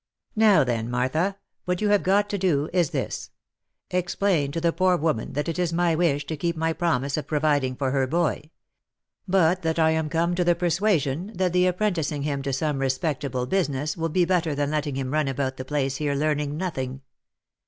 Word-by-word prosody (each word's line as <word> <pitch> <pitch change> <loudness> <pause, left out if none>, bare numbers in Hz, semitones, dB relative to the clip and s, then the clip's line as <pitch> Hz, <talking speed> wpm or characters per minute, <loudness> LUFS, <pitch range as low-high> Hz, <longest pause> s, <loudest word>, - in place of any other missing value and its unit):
Now 215 -8 +5
then, 115 -2 -2
Martha, 155 +11 0 0.3
what 180 0 -1
you 210 - +1
have 205 -1 +4
got 200 +2 +2
to 205 - -1
do 155 -5 +1
is 175 -5 +2
this: - - -4 0.6
Explain 175 -4 0
to 165 - -2
the 165 0 +1
poor 185 -1 +3
woman 150 -8 -1
that 145 +3 -2
it 165 +1 -3
is 175 -2 +1
my 170 0 +2
wish 155 -4 +1
to 160 - -4
keep 170 +2 -2
my 160 0 0
promise 140 -5 0
of 155 - -4
providing 145 -4 +1
for 135 0 -1
her 135 -1 +1
boy; 160 0 -1 0.8
but 185 -1 +3
that 160 -1 -1
I 160 -1 +4
am 160 -1 0
come 170 +2 +1
to 180 0 +1
the 175 0 +3
persua 175 +2 +2
sion 155 +10 -4
that 180 -1 0
the 180 0 +4
apprenticing 175 -7 -1
him 140 -2 -2
to 135 0 -3
some 145 +1 -1
respectable 135 -1 -1
business 150 -3 -1
will 165 -1 -2
be 175 +2 +2
better 170 -4 +1
than 145 0 -1
letting 150 -2 -1
him 130 -1 -3
run 155 -2 +1
about 135 0 -2
the 130 - -6
place 135 -2 -1
here 145 -2 -1
learning 150 0 -1
nothing. 135 -7 -4
155 Hz, 205 wpm, -25 LUFS, 140-175 Hz, 0.8 s, Now